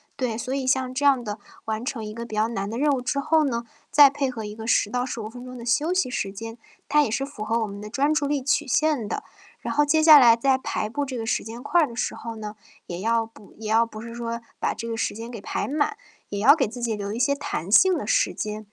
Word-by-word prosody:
对， 240 -4 -2
所 255 +3 -4
以 270 -1 -2
像 260 -1 +1
这 270 +3 -3
样 275 -3 +4
的 210 -1 -5 0.3
完 220 0 -3
成 245 -4 -4
一 210 - -6
个 235 +1 -6
比 230 -2 -7
较 215 +1 +2
难 200 -3 -3
的 225 - -4
任 295 +3 +2
务 265 -3 0
之 250 +3 -1
后 315 +2 +3
呢， 235 -4 -1 0.3
再 285 -2 +7
配 280 -1 -1
合 225 -4 -6
一 210 - -6
个 220 +1 -8
10 210 -3 +2
到 245 +1 0
15 235 -4 -5
分 245 +3 -10
钟 255 0 -9
的 235 - -8
休 295 +8 +1
息 370 -6 +1
时 205 -6 -3
间， 225 +3 -7 0.3
它 300 +1 +4
也 290 - +1
是 270 +5 -1
符 275 -6 -8
合 225 +2 0
我 225 - 0
们 200 -1 -8
的 210 - -7
专 280 +6 +1
注 295 -2 0
力 285 -2 -1
曲 285 +2 +1
线 285 -3 +1
的。 - - -4 0.4
然 - - -4
后 295 - +4
接 310 +2 +2
下 310 -2 +10
来 235 -3 +7
在 265 +3 +2
排 215 - -2
布 285 +7 -2
这 260 -2 -4
个 225 - -4
时 - - 0
间 230 +3 -8
块 315 +1 +3
的 235 - -10
时 - - -2
候 230 -1 -7
呢， 215 -1 -7 0.3
也 175 0 -6
要 225 +3 +1
补 220 -2 -18
也 220 - -7
要 225 +2 +3
不 215 -1 -10
是 230 0 -8
说 235 0 -4 0.2
把 - - -1
这 230 - -6
个 230 - -3
时 225 - -2
间 230 +2 -7
给 230 -4 -8
排 - - -3
满， 300 +9 0 0.3
也 205 - -4
要 250 +9 +7
给 275 -7 +1
自 235 +4 -8
己 235 -2 -1
留 200 -1 -4
一 220 - -4
些 255 +4 +2
弹 200 - -4
性 370 - +6
的 - - -4
时 - - +1
间。 215 0 -5
235 Hz, 300 characters per minute, -24 LUFS, 220-280 Hz, 0.4 s, 下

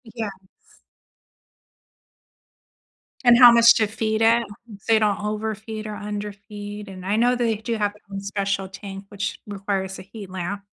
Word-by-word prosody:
Yes. 195 -5 -6 2.8
And 240 -1 +8
how 245 -1 +10
much 235 0 +7
to 220 - +2
feed 220 +1 -1
it, 230 +1 +5 0.4
so 225 - +1
you 220 - +5
don't 210 -1 +1
overfeed 215 +1 -4
or 210 - -5
underfeed, 205 0 -7
and 185 -1 -9
I 200 +2 +1
know 245 +3 +3
they 235 -2 +1
do 225 +2 -3
have 205 -1 0
their 210 - -21
own 195 - -4
special 200 -1 -2
tank, 195 0 -9
which 200 -1 -4
requires 195 -1 -3
a - - -9
heat 195 0 -10
lamp. 190 +2 -4
210 Hz, 155 wpm, -23 LUFS, 195-220 Hz, 2.8 s, how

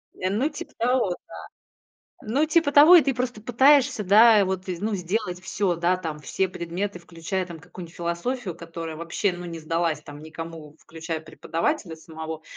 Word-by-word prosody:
Ну 205 +10 0
типа 295 - -9
того, 245 -3 +1 0.2
да. - - -14 0.9
Ну 265 +8 +1
типа 320 -1 +2
того, 295 +5 +9
и 330 - +7
ты 270 -1 0
просто 245 -3 -3
пытаешься, 260 0 +4
да, 210 +2 +7
вот, 190 0 -3
ну, 195 +4 -2
сделать 180 0 -2
всё. 185 0 -1
Да, 175 +2 +1
там 160 -4 -6
все 190 +5 -1
предметы, 180 +3 -4
включая, 170 +2 -4
там 170 -2 -9
какую-нибудь 170 +2 -11
философию, 175 +5 -3
которая 165 -1 -7
вообще 170 +4 -1
ну 175 0 -8
не 170 -1 -6
сдалась, 165 0 -1
там, 145 0 -11
никому, 160 -1 -9
включая 160 0 -6
преподавателя 165 - -3
самого. 160 -1 -8
180 Hz, 160 wpm, -25 LUFS, 165-220 Hz, 0.9 s, того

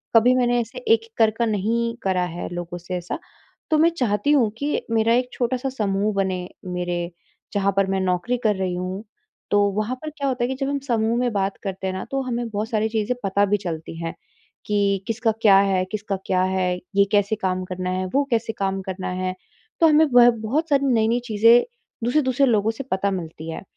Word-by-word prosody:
कभी 235 +3 +6
मैंने 245 -1 +2
ऐसे 230 - -8
एक-एक 455 -1 +2
कर 225 - +5
कर 235 - +2
नहीं 230 +3 0
करा 185 -2 +1
है - - -4
लोगों 175 0 -5
से 175 +1 -6
ऐसा। 175 - -5 0.5
तो 310 - +3
मैं 325 +2 +5
चाहती 255 -4 0
हूँ 260 -7 +4
कि 290 +4 -1
मेरा 225 0 +3
एक 250 +1 +1
छोटा-सा 255 +2 -1
समूह 210 -4 -1
बने। 190 -2 -1 0.2
मेरे 175 -1 -2 0.5
जहाँ 200 -1 +2
पर 195 - +4
मैं 195 - +1
नौकरी 185 +6 0
कर 215 -2 +3
रही 190 -1 -2
हूँ, 185 +3 -4 0.5
तो 205 - +4
वहाँ 215 +5 -2
पर 310 - -5
क्या 290 -2 -4
होता 250 -2 -1
है - - +2
कि 265 - -3
जब 270 0 -1
हम 280 0 -1
समूह 230 -1 +1
में 245 -1 +1
बात 195 -1 -1
करते 190 -1 -4
हैं 190 - -2
ना, 190 - -4
तो 270 0 0
हमें 240 -2 -2
बहुत 215 +1 -3
सारी 220 0 0
चीज़ें 220 +2 -1
पता 200 +1 +2
भी 205 +1 +1
चलती 165 -4 -6
हैं 165 - -3 0.5
कि 200 -2 +1
किसका 225 0 +1
क्या 200 -3 +7
है, 195 -2 +2
किसका 210 -2 -2
क्या 185 -1 +1
है, 185 -1 0 0.2
ये 200 0 +5
कैसे 205 0 +2
काम 185 -2 -2
करना 185 0 -4
है, 185 0 -1
वो 285 - +4
कैसे 230 -1 0
काम 195 -1 -2
करना 185 0 -4
है। 185 0 -2 0.4
तो 330 - +6
हमें 310 0 +6
वह 245 0 +8
बहुत 235 +9 -2
सारी 280 -1 +3
नई-नई 225 +1 +2
चीज़ें 230 +1 +5 0.4
दूसरे-दूसरे 260 +1 +2
लोगों 220 -3 +2
से 225 +5 -7
पता 195 +1 +1
मिलती 165 -3 -6
हैं। - - -7
215 Hz, 210 wpm, -23 LUFS, 190-245 Hz, 0.5 s, वह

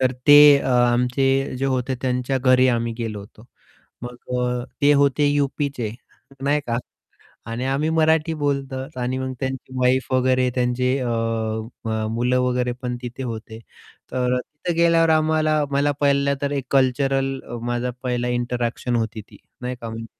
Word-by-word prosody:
तर 130 -1 +2
ते 145 -1 +9
अ, - - -3
आमचे 125 +2 +2
जे 135 - -2
होते 130 0 -1
त्यांच्या 125 +1 0
घरी 130 0 +4
आम्ही 115 -1 0
गेलो 110 -3 -4
होतो. 105 +2 -15 0.6
मग 120 0 -7 0.2
अ, 125 0 -1 0.2
ते 145 +1 +6
होते 140 +1 +3
यूपीचे, 140 -4 -1 0.5
नाही 145 +2 +2
का. 115 0 -1 0.7
आणि 115 +2 -3
आम्ही 140 +4 0
मराठी 160 0 +2
बोलतो 140 -2 -1 0.2
आणि 125 +1 -2
मग 130 0 -3
त्यांची 130 -1 -4
वाईफ 130 +1 +1
वगैरे 130 0 +2
त्यांचे 125 +1 +1
अ, 125 - -2 0.8
म 110 -1 -2
मुलं 125 +2 +1
वगैरे 125 -1 0
पण 125 -1 -3
तिथे 125 +2 -6
होते. 110 -2 -6 0.5
तर 125 0 0
अ, 125 - 0
तिथं 155 +6 -5
गेल्यावर 165 -1 +4
आम्हाला 155 -1 +2
मला 140 +1 +1
पहिला 140 0 +2
तर 140 - 0
एक 140 -2 -2
कल्चरल 135 0 +2
अ, 120 - -8
माझा 120 +1 -1
पहिला 125 -1 -1
इंटरॅक्शन 120 0 -2
होती 110 -1 -2
ती - - -14 0.3
नाही 125 0 -3
का, 115 - -6
म्हणजे 115 0 -7
130 Hz, 160 wpm, -22 LUFS, 125-140 Hz, 0.8 s, ते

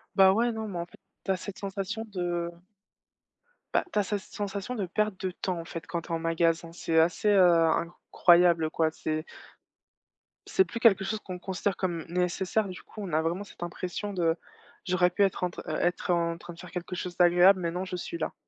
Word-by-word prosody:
Bah, 190 -1 +7
ouais, 235 +4 +2
non 220 -1 -4
mais 185 - -5
en 170 - -3
fait, - - -19 0.3
tu 195 - +1
as 185 - +1
cette 195 +2 -8
sensation 200 +2 -4
de 175 -4 -2 1.2
bah, - - +3
tu - - -3
as 205 - +4
cette 205 +1 -2
sensation 205 +4 -5
de 205 -5 -1
perte 210 +2 -1
de 185 - 0
temps, 180 -1 -3
en 165 - -7
fait, 165 0 -7
quand 170 -2 -3
tu - - -14
es - - -5
en 165 - -2
magasin. 165 0 +1
C'est 165 -2 +1
assez, 175 +5 +2
heu, 200 -2 +6
incroyable, 170 0 +4
quoi. 160 0 +1
C'est 155 0 -3 1.2
c'est 380 - +3
plus 235 - -6
quelque 195 -5 +5
chose 220 +1 -2
qu'on 185 -3 -7
considère 190 +1 -2
comme 175 -4 -2
nécessaire, 180 +4 0
du 185 - -8
coup, 215 - -10
on 180 -5 -6
a 155 - +3
vraiment 170 +5 -1
cette 175 - -10
impression 180 +4 -4
de 170 -3 +2 0.5
j'aurais 180 -1 +3
pu 200 +3 +2
être 190 -1 0
en 180 - +2
tr - - -9
heu, - - -2
être 180 0 0
en 170 -1 +1
train 175 +1 -10
de 165 - -16
faire 180 - -10
quelque 180 +1 -5
chose 180 0 -5
d'agréable, 180 +2 +6
mais 170 -1 -1
non, 180 +2 -3
je 185 - -5
suis 335 - -5
là - - -3
180 Hz, 220 wpm, -28 LUFS, 170-195 Hz, 1.2 s, Bah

